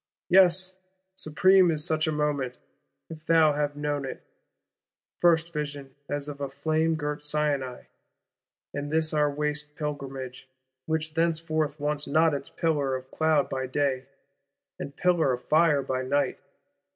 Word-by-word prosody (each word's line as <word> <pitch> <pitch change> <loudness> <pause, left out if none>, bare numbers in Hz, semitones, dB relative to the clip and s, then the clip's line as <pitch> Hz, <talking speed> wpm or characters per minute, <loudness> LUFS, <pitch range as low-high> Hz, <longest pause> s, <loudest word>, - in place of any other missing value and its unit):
Yes, 185 0 +4 0.4
supreme 185 +2 +4
is 155 -2 0
such 155 0 +1
a - - +1
moment 145 -4 -1 0.5
(if 155 -1 -9
thou 160 -2 +4
have 145 0 -1
known 145 -1 -2
it): 135 - -6 1.0
first 170 -1 +3
vision 145 -3 -5 0.2
as 145 0 -3
of 145 -1 -7
a 140 - -2
flame 155 +4 0
girt 150 -1 -3
Sinai, 150 -4 -1 0.9
in 145 0 -4
this 160 0 +2
our 150 -1 +3
waste 150 +1 -3
Pilgrimage,—which 135 +1 -5
thenceforth 160 -2 0
wants 150 0 -1
not 160 +2 +3
its 140 -1 -4
pillar 145 -5 0
of 130 0 -8
cloud 155 -2 +2
by 130 -1 -3
day, 130 -1 -1 0.7
and 140 - -6
pillar 170 -7 +2
of 125 - -5
fire 150 -3 +3
by 130 -1 -2
night! 140 +2 0
150 Hz, 140 wpm, -27 LUFS, 140-160 Hz, 1.0 s, Yes